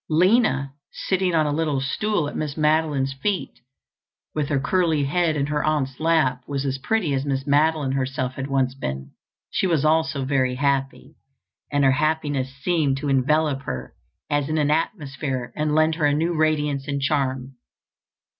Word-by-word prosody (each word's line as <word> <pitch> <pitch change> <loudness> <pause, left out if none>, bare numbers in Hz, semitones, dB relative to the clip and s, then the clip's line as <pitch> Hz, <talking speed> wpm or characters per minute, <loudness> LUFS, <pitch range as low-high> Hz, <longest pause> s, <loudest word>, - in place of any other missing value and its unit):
Lina, 165 - +3 0.2
sitting 185 -2 0
on 155 -1 +3
a 150 - 0
little 150 -3 0
stool 170 +5 -1
at - - -7
Miss 150 -1 -3
Madeline's 150 -3 +1
feet 185 +8 -3 0.7
with 150 -1 -2
her 140 -3 +1
curly 160 0 +1
head 160 +3 +1
in 140 -2 0
her 150 0 -1
aunt's 140 -4 -1
lap, 155 -6 +2
was 140 -1 -2
as 135 -1 -2
pretty 185 -2 0
as 135 0 0
Miss 135 -1 -2
Madeline 150 -1 +2
herself 130 -1 -2
had 135 +1 -5
once 135 -2 +1
been. 65 - -5 0.4
She 190 - +1
was 160 -4 +1
also 155 -3 +1
very 130 -2 +1
happy, 140 +1 -1 0.5
and 145 -1 +2
her 135 - +5
happiness 145 -2 0
seemed 140 0 0
to 145 +1 -3
envelop 140 +1 +2
her 65 0 -5 0.3
as 145 -1 0
in 155 - 0
an 150 -1 +2
atmosphere 140 -6 -2
and 150 0 0
lend 155 +1 +3
her 155 -2 +1
a 145 - +2
new 165 +3 0
radiance 150 -3 0
and 140 -1 -1
charm. 135 -2 -1
145 Hz, 170 wpm, -23 LUFS, 135-155 Hz, 0.7 s, her